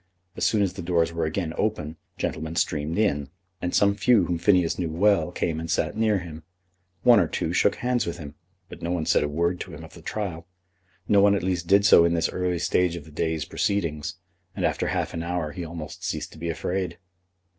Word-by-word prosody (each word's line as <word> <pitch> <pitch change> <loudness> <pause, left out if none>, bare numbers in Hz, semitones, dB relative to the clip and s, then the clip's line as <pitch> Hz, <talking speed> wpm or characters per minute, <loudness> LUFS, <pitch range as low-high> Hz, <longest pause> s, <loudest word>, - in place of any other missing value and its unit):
As - - +1
soon 105 -2 +2
as 95 - -1
the 95 - -6
doors 85 -1 +1
were 85 -1 -1
again 80 +1 -2
open 80 -8 -1 0.2
gentlemen 80 +1 -3
streamed 80 0 -1
in, 75 -10 +1 0.3
and 90 - -1
some 100 0 +4
few 105 -2 +3
whom 85 -1 -2
Phineas 90 -3 +3
knew 85 -2 -1
well 95 +2 +2
came 80 -2 -2
and 80 0 -5
sat 85 - 0
near 110 -2 +2
him. 85 -3 -7 0.6
One 120 -3 +7
or 90 - +2
two - - -2
shook - - +3
hands 125 -3 0
with 85 - -3
him, 70 -2 -8 0.3
but - - -11
no 85 - -3
one 85 -2 -1
said - - +3
a 75 - -1
word 85 +4 0
to - - -7
him - - -10
of - - -12
the - - -12
trial. 90 -5 -4 0.6
No 100 -1 +5
one 100 0 +5
at 100 - -2
least 90 -2 -1
did 100 +2 +5
so 95 -4 +8
in 85 0 +2
this 85 0 +1
early 90 -1 -1
stage 90 0 +1
of 85 -4 -8
the 80 - -14
day's 80 +1 -1
proceedings; 85 -5 -1 0.4
and - - -1
after - - 0
half - - -1
an 80 - -3
hour 85 -2 -2
he 90 - -6
almost 80 -2 -8
ceased - - -3
to - - -13
be 85 +1 -3
afraid. 90 +3 -2
85 Hz, 225 wpm, -25 LUFS, 80-100 Hz, 0.6 s, so